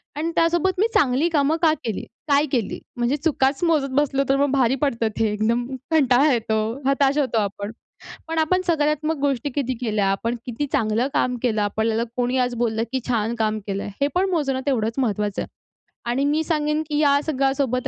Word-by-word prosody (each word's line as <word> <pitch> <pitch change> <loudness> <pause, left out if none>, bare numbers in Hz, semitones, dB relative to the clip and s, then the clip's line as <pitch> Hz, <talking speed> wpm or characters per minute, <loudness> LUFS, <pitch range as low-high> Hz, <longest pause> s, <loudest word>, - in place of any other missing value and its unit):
आणि 320 +3 -2
त्यासोबत 345 +3 +2
मी 430 - +4
चांगली 270 +4 +3
कामं 310 0 +2
का 320 -2 +5
केली? 220 -4 -3 0.3
काय 285 0 +4
केली? 235 -7 -1 0.2
म्हणजे 240 +3 +1
चुकाच 285 -1 0
मोजत 310 -5 +2
बसलो 275 -1 +1
तर 270 - +4
मग 285 - -2
भारी 265 -2 +2
पडतं 235 -6 +1
ते 220 -2 +2
एकदम 225 +3 0 0.3
कंटाळा 285 -2 +4
येतो, 220 -2 0 0.3
हताश 275 +1 +2
होतो 265 -5 +1
आपण. 200 0 -3 0.6
पण 325 0 -2
आपण 320 +4 +2
सकारात्मक 305 -1 +1
गोष्टी 280 -1 0
किती 260 -3 -1
केल्या, 215 -4 0
आपण 230 +5 -2
किती 250 +4 -3
चांगलं 225 +4 +1
काम 250 0 +1
केलं 225 -4 +1
आपल्याला 220 +2 0
कोणी 250 +1 0
आज 250 -1 +1
बोललं, 225 -2 0
की 260 - 0
छान 230 -1 0
काम 215 -1 0
केलंय, 200 0 -3
हे 280 - +3
पण 375 +2 +2
मोजणं 280 -7 0
तेवढंच 230 -3 0
महत्वाचं 210 -5 -1
आहे. - - -8 0.6
आणि 270 +3 0
मी 300 +2 +1
सांगेन, 300 -1 0
की 295 - -1
या 285 -2 +4
सगळ्यासोबत 270 -3 0
270 Hz, 185 wpm, -22 LUFS, 230-295 Hz, 0.6 s, का